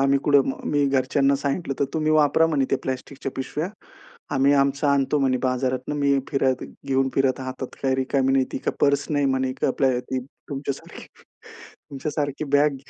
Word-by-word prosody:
आम्ही 135 0 +3
कुठं. 140 -2 +4 0.2
मी 145 -1 +2
घरच्यांना 135 +1 +2
सांगितलं 140 +2 -2
तर, 140 - +4
तुम्ही 155 -1 +1
वापरा 155 +1 +4
म्हणे 145 -4 +1
त्या 135 - +2
प्लास्टिकच्या 130 +1 -5
पिशव्या. 150 +6 -3 0.7
आम्ही 135 +1 +4
आमचं 140 +1 +2
आणतो 140 +1 +2
म्हणे 130 -2 +2
बाजारातनं, 130 +1 -1
मी 140 -1 +2
फिरत 130 -2 +1 0.2
घेऊन 135 -1 +2
फिरत 135 -1 +1
हातात, 130 0 -6
काही 135 -1 +2
रिकामी 135 0 +1
नाही, 135 -1 +3
ती - - -2
काय - - -2
पर्स 140 -1 +3
नाही 145 -1 +1
म्हणे 130 -1 0
आपल 130 -1 +1
ती 130 +1 -4 0.3
तुमच्यासारखी. 140 -1 -6 0.8
तुमच्यासारखी 145 +1 -3
बॅग 145 -1 +4
135 Hz, 165 wpm, -24 LUFS, 130-145 Hz, 0.8 s, कुठं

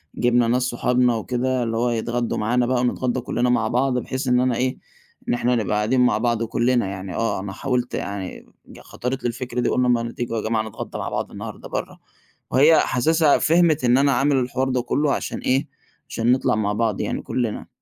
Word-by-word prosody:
جِبنا 120 -1 +2
ناس 125 +2 +2
صُحابنا 125 0 +1
وكده 125 +3 -1
اللي 115 -1 -2
هو 120 +2 +1
هيتغَدّوا 120 0 -1
مَعَانا 120 +3 +1
بقى 125 0 +1
ونِتغَدّا 125 0 0
كُلّنا 125 0 -1
مع 115 -2 +2
بعض، 125 +3 +1
بحيث 130 +2 -3
إن 125 0 +3
أنا 125 -1 +1
إيه، 130 +2 -1 0.5
إن - - +2
إحنا 120 +1 +1
نبقى 105 -2 -1
قاعدين 110 +5 +2
مع 125 -4 +3
بعض 115 0 0
و 115 - -1
كُلّنا 120 -1 +1
يعني 95 -1 -6
آه، 115 -3 -1
أنا 95 0 -6
حاولت 125 +1 -2
يعني 100 -2 -5 0.3
خَطَرِت 130 +2 -5
لي - - +1
الفكرة 120 +1 -4
دي - - +1
قُلنا 125 0 +1
ما 115 -1 +1
تييجوا 120 -1 -4
يا 110 - -1
جماعة 110 -1 +1
نِتغَدّا - - -7
مع - - -3
بعض - - -3
النهارده - - -8
برّه، - - -5 0.5
وهي 150 +4 +6
حاسِسها 155 +4 +3
فهمِت 165 -2 +3
إن 125 +1 +4
أنا 140 +1 +3
عامل 135 +3 +2
الحوار 130 +1 0
ده 125 -1 0
كله 140 +4 0
عشان - - -3
إيه 130 +2 0 0.4
عشان 115 +2 +1
نِطلع 130 -4 +2
مع 105 -1 0
بعض 110 -1 0
يعني - - -2
كُلّنا. 120 -4 -3
125 Hz, 205 wpm, -22 LUFS, 115-130 Hz, 0.5 s, وهي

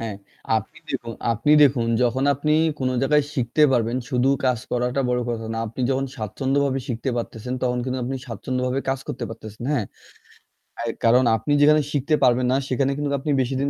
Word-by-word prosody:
হ্যাঁ, 110 -3 -4 0.4
আপনি 110 +9 -5
দেখুন 120 -3 -4 0.2
আপনি 115 +6 0
দেখুন 130 -5 +4 0.2
যখন 125 +2 +1
আপনি 150 +3 0 0.3
কোন 130 - 0
জায়গায় 150 +1 +3
শিখতে 125 +3 +1
পারবেন, 120 -1 +1
শুধু 125 +1 +2 0.2
কাজ 125 -2 +2
করাটা 125 +2 0
বড় 125 0 +1
কথা 115 -1 -4
না। 115 - -3
আপনি 115 +4 -7
যখন 135 0 0
স্বাচ্ছন্দ্যভাবে 135 +5 -1
শিখতে 120 +1 -2
পারতেছেন 120 +1 -4
তখন 125 -1 0
কিন্তু 130 0 -2
আপনি 135 +2 -3
স্বাচ্ছন্দ্যভাবে 125 +3 -2
কাজ 135 0 +1
করতে 125 -1 -4
পারতেছেন। 110 0 -9
হ্যাঁ। 125 -8 0 0.9
অ্যা - - -5 0.2
কারণ 120 +3 +5
আপনি 110 +6 -3
যেখানে 150 +1 +6
শিখতে 145 +2 +1
পারবেন 125 0 +4
না - - +3
সেখানে 135 +1 +1
কিন্তু 145 -1 -2
আপনি 150 +2 -2
বেশি 130 +1 -2
দিন 140 - +1
125 Hz, 185 wpm, -23 LUFS, 120-135 Hz, 0.9 s, যেখানে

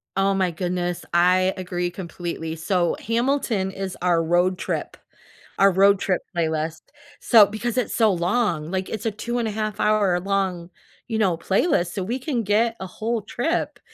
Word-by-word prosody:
Oh, 195 +1 +2
my 185 -2 +1
goodness, 175 0 -3
I 185 +2 +4
agree 180 -1 -2
completely. 170 -2 -5
So, 175 +1 0
Hamilton 230 -4 0
is 190 -1 -5
our 175 -2 +2
road 175 +3 +2
trip - - -4 0.6
our 195 0 +5
road 195 +2 +5
trip 185 -3 0
playlist, 160 -1 -1 0.4
so 220 -4 +7
because 235 +4 -4
it's 250 - 0
so 220 -3 +4
long. 175 -3 0
Like, 190 0 -2
it's 220 0 -5
a 225 - +1
two-and-a-half-hour-long, 205 -5 -1 0.4
you 225 -2 -2
know, 190 -6 +2
playlist, 180 - +1
so 195 - -3
we 240 +7 -3
can 250 -4 -2
get 225 +3 +2
a 190 - -3
whole 225 +4 -3
trip 245 - -2
190 Hz, 150 wpm, -23 LUFS, 175-220 Hz, 0.6 s, so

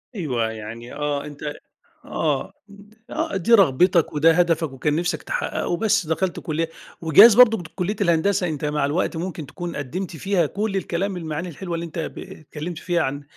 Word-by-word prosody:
أيوه 125 - -1
يعني 110 +2 -8
آه 145 -1 -2
أنت 150 0 -6 0.5
آه، 150 +4 -2 0.6
آه 320 -6 -2
دي 230 +6 +1
رغبتك 175 - +4
وده 155 +2 +5
هدفك 165 -3 +2
وكان 145 +3 -1
نِفْسك 175 +2 -1
تحققه، 175 - -2
بس 215 -4 +2
دخلت 170 +3 -1
كُلِّية 165 +1 -2 0.3
وجايز 200 +8 +8
برضو 225 -6 +6
كُلِّية 185 +5 -1
الهندسة 180 +1 +2
أنت 150 -2 -3
مع 150 -1 0
الوقت 160 +3 -1
ممكن 165 -3 -4
تكون 175 +4 -6
قدِّمت 165 +6 -5
فيها 190 0 +1
كُلّ 200 +6 -2
الكلام 190 +1 -2
المعاني 165 +1 -4
الحلوة 170 +2 -5
اللي 165 0 -4
أنت 165 0 -7 0.2
ب - - -7
اتكلِّمْت 155 +2 -8
فيها 175 -1 0
عن 145 0 -2
165 Hz, 165 wpm, -23 LUFS, 150-185 Hz, 0.6 s, وجايز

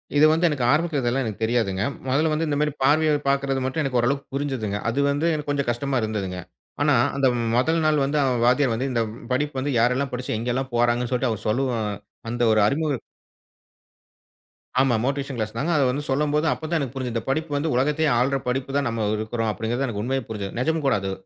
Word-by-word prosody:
இது 145 +1 +6
வந்து 165 +2 +2
எனக்கு 145 -5 -2
ஆரம்பத்துல 155 0 +1
இதெல்லாம் 125 +2 0
எனக்கு 110 -1 -5
தெரியாதுங்க. 110 -5 0 0.3
முதல்ல 155 +4 +2
வந்து 160 +2 0
இந்த 145 -1 0
மாரி 150 0 +1
பார்வையை 155 +3 +4 0.2
பார்க்கறது 135 -1 0
மட்டும் 135 +5 -1
எனக்கு 130 -3 0
ஓரளவிற்கு 140 +4 -1
புரிஞ்சதுங்க. 130 -8 -2
அது 120 +5 -1
வந்து 145 +3 -1
எனக்கு 150 -1 -4
கொஞ்சம் 140 -3 -1
கஷ்டமா 130 +2 -1
இருந்ததுங்க. 100 -4 -3 0.4
ஆனா - - +4 0.2
அந்த 135 -1 +3 0.3
முதல் 160 +6 +2
நாள் 150 -2 +3
வந்து 145 +2 -1
அந்த 130 -2 +2
வாத்தியார் 125 0 +3
வந்து 130 +4 -2
இந்த 120 -2 +1 0.3
படிப்பு 145 +1 -1
வந்து 140 +2 -1
யாரெல்லாம் 125 +4 +1
படிச்சு 125 -2 -3
எங்க 115 +3 -3
எல்லாம் 130 +1 -3
போறாங்கள்ன்னு 120 +1 +1
சொல்லிட்டு 125 -1 +1
அவர் 110 -1 -5
சொல்லவும், 120 0 0 0.5
அந்த 120 +1 -3
ஒரு 110 - +3
அறிமுகம் 145 0 0 1.8
ஆமா 130 -3 +3
மோட்டிவேஷன் 140 -1 -2
கிளாஸ் 110 -1 -3
தாங்க. 155 +8 0
அத 140 - +3
வந்து 145 +3 -3
சொல்லும்போது 150 +3 +1
அப்போ 160 - -8
தான் 170 - +1
எனக்கு 135 -4 -3
புரிஞ்ச்சது. 125 -3 -3
இந்த 115 - -1
படிப்பு 155 +3 -1
வந்து 155 +3 -1
உலகத்தையே 150 +4 +2
ஆள்ற 135 +3 +2
படிப்பு 135 +2 -2
தான் 140 - 0
நம்ம 115 -2 -2
இருக்கிறோம் 110 +1 -2
அப்படிங்கறது 115 +6 -2
எனக்கு 105 -4 -3
உண்மையே 135 +2 -1
புரிஞ்சது. 100 -3 -5
நிஜம் 160 +4 0
கூட 135 - +3
அது. 95 0 -3
135 Hz, 205 wpm, -24 LUFS, 120-145 Hz, 1.8 s, இது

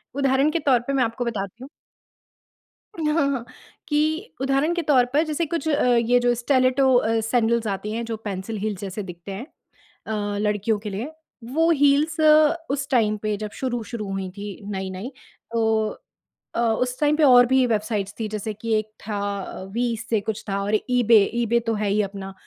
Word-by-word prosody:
उदाहरण 275 +1 +2
के 335 - 0
तौर 275 -5 +3
पे 275 - 0
मैं 265 -2 +3
आपको 230 +2 -2
बताती 220 0 -4
हूँ 270 - -10 1.3
उ, - - -4
हाँ, 285 -3 +2
हाँ 250 -4 -3 0.4
कि 315 +7 0
उदाहरण 275 +5 +1
के 345 - 0
तौर 275 -6 +4
पर 300 +2 +4
जैसे 310 +2 -1
कुछ 320 -1 -3
अ, 295 0 +2
ये 240 +1 +3
जो 245 0 +2
स्टिलेटो 255 +1 +3
अ, 225 -2 +2
सैंडल्स 230 0 +1
आती 205 +1 -3
हैं 230 +2 -2
जो 225 -1 -4
पेंसिल 210 0 -5
हील्स 205 -2 -3
जैसे 200 +1 -5
दिखते 180 +1 -9
हैं 200 +6 -6 0.6
अ, 205 -2 -2
लड़कियों 210 +1 0
के 210 0 -6
लिए, 215 +9 -5 0.3
वो 320 +8 +1
हील्स 290 +2 +3 0.5
उस 275 0 -2
टाइम 215 -4 +2
पे 215 -1 0
जब 210 0 -5
शुरू-शुरू 235 -4 -3
हुई 195 -1 -3
थी 205 +1 -5 0.2
नई-नई 190 +4 -5 0.4
तो 220 -1 +1 0.7
अ, - - 0
उस 250 +2 0
टाइम 295 0 +3
पे 315 - +3
और 245 -3 +8
भी 260 0 +4
वेबसाइट्स 210 -3 -1
थीं 220 -1 -2
जैसे 215 0 -4
कि 225 +2 -3
एक 215 0 -7 0.2
था 205 -2 -2 0.5
वी 235 0 0
से 220 -3 +1
कुछ 220 +1 -4
था 200 0 -1
और 205 +2 +1
ईबे, 235 -4 +5
ईबे 235 0 +2
तो 225 - +2
है 210 -1 -1
ही 210 +2 +2
अपना, 195 -1 -6
230 Hz, 185 wpm, -23 LUFS, 210-265 Hz, 1.3 s, और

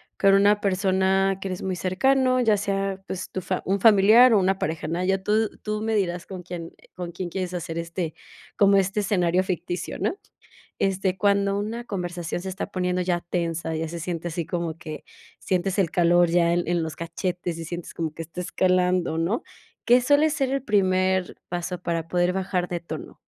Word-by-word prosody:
con 195 0 +4
una 205 +1 +4
persona 190 0 +2
que 195 - -3
eres 185 -1 -5
muy 190 -1 -1
cercano, 255 +8 +2
ya 225 -4 +4
sea, 195 -1 -2
pues 185 0 -5
tu 185 - -3
fa 185 +1 -2
un 195 0 0
familiar 225 +3 +7
o 210 - +5
una 190 +1 +2
pareja, 155 0 -2
¿no? 170 +3 -1
Ya 190 +1 +1
tú 215 +2 +1
tú 215 0 -2
me 220 0 0
dirás 180 -3 -1
con 185 -2 -8
quién 175 -1 -7 0.2
con 175 -1 -6
quién 175 +1 -5
quieres 180 0 -4
hacer 165 -2 -4
este 170 -1 -3 0.4
como 200 -1 +5
este 195 +2 +1
escenario 180 -3 +2
ficticio, 175 -1 -4
¿no? - - 0 0.6
Este, 190 -1 0
cuando 200 0 +2
una 225 +4 -4
conversación 175 -4 -4
se 190 - -4
está 185 - -4
poniendo 180 -2 -1
ya 175 -1 0
tensa, 170 -2 -2
ya 160 0 -2
se 170 +1 -6
siente 170 0 -3
así 170 0 -3
como 165 -1 -3
que 155 -2 -8 0.3
sientes 185 +1 -1
el 180 -4 +2
calor 175 0 +4
ya 170 0 +3
en 175 0 +1
en 175 -1 +1
los 160 -2 -5
cachetes 175 +1 -3
y 165 - -5
sientes 175 +1 -7
como 160 -2 -3
que 165 - -7
está 165 +2 -8
escalando, 180 -2 +1
¿no? 170 +9 0 0.4
¿Qué 245 +1 +6
suele 290 +4 +4
ser 275 -3 0
el 275 0 -1
primer 190 -3 +1
paso 175 0 -4
para 165 -2 -2
poder 175 +1 +1
bajar 185 -2 -1
de 175 -1 -3
tono? 170 - -8
185 Hz, 195 wpm, -25 LUFS, 175-195 Hz, 0.6 s, familiar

